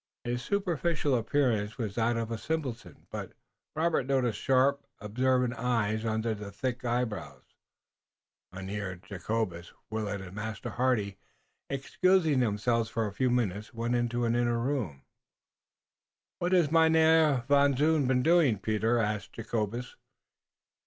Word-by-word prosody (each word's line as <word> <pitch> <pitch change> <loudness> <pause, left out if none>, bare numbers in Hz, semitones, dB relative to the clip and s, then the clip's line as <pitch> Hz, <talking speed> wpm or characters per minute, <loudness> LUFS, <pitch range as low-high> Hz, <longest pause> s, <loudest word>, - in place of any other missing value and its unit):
His 120 0 -2
superficial 170 -3 0
appearance 115 -3 0
was 110 -5 -3
that 115 +2 +1
of 115 0 -3
a 115 - -2
simpleton, 120 - -4
but - - -6 0.4
Robert 160 -4 +1
noticed 130 -4 +1
sharp, 135 +2 +2 0.2
observant 125 +4 +1
eyes 115 -3 0
under 110 0 0
the 105 -1 -7
thick 125 +4 -3
eyebrows. 120 -3 -2 1.1
Mynheer 95 +1 -5
Jacobus, 90 -1 -4 0.2
Willet 105 -2 -2
and 95 -1 -9
Master 110 +2 -5
Hardy, 110 -6 0 0.5
excusing 155 +2 +2
themselves 115 0 +1
for 115 -1 -1
a 105 - -4
few 130 +4 +1
minutes, 110 -2 -1
went 115 +1 -1
into 120 0 0
an 115 0 +1
inner 120 -1 +1
room. 115 - -2 1.4
"What 175 +1 0
has 170 -5 +4
Mynheer 160 -4 +4
Van 140 -1 +4
Zoon 150 -1 +3
been 125 -1 +2
doing, 160 -9 +4
Peter?" 110 +4 0
asked 105 -2 -2
Jacobus. 115 +1 -3
120 Hz, 130 wpm, -29 LUFS, 110-135 Hz, 1.4 s, has